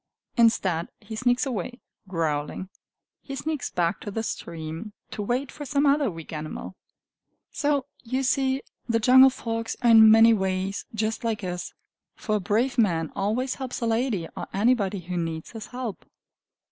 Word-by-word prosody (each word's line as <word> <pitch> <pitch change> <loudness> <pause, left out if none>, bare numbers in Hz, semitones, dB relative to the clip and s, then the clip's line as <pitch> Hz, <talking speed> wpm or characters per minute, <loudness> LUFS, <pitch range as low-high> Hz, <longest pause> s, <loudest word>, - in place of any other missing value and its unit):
Instead, 195 -8 +3
he 220 +1 -8
sneaks 245 +4 +2
away, 245 0 -4 0.3
growling. 160 0 -2 0.5
He 275 - -7
sneaks 305 -1 -3
back 170 -1 0
to 210 - -5
the 220 +2 -3
stream, 165 +2 -5 0.2
to - - -4
wait 250 +6 -1
for 295 - -8
some 285 +1 +1
other 280 -2 +3
weak 165 -3 -9
animal. 155 +4 -6 0.8
So, 285 -3 0 0.2
you 255 +3 -1
see, 265 +1 +1 0.3
the 230 - +3
jungle 260 +3 +8
folks 230 -3 -4
are 235 - +6
in 220 -1 +9
many 225 +1 +8
ways 190 0 -1
just 220 +1 -1
like 220 -3 -1
us; 180 -1 -4 0.4
for 215 -2 -1
a - - -2
brave 225 +7 0
man 165 -7 +2
always 235 +7 0
helps 255 -1 -4
a 235 - -1
lady 225 -6 0
or - - -5
anybody 205 -2 +2
who 180 +1 -4
needs 165 -1 -3
his 225 -2 -8
help. 245 -4 -5
225 Hz, 160 wpm, -26 LUFS, 185-250 Hz, 0.8 s, in